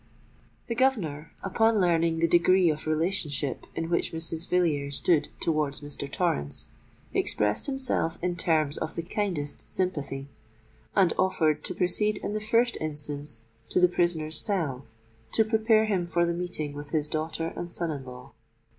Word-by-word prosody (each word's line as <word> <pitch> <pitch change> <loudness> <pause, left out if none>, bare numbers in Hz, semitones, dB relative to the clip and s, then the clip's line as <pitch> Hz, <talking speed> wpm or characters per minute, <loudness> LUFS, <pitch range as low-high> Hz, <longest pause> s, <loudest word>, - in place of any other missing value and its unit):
The - - -2
governor, 200 - 0
upon 225 +3 +3
learning 170 -2 +2
the 165 +1 +3
degree 175 +1 +5
of 155 +1 -5
relationship 155 -4 -1
in 165 - -2
which 170 0 0
Mrs. 165 +1 -4
Villiers 145 -6 +1
stood 160 -4 +2
towards 150 -3 0
Mr. 145 -1 -6
Torrens, 120 - -1 0.4
expressed 105 0 +1
himself 260 -12 0
in 180 0 -1
terms 155 -4 +2
of 160 - -4
the 170 - -3
kindest 170 -6 -3
sympathy, 145 -7 -2 0.7
and 190 -4 +4
offered 160 -5 +2
to 180 - -4
proceed 210 +4 +1
in - - -2
the 215 - -2
first 230 +3 +2
instance 145 -5 -4 0.3
to - - +2
the 180 - +7
prisoner's 165 -3 +1
cell 155 - -1 0.5
to 220 - +4
prepare 220 0 +3
him 190 -5 0
for 170 0 +2
the 170 - 0
meeting 170 -4 -3
with 145 0 -8
his 150 -1 0
daughter 160 +2 -2
and 175 0 -5
son 170 -2 -1
in 140 -3 -5
law. 125 -1 -11
165 Hz, 155 wpm, -27 LUFS, 150-185 Hz, 0.7 s, the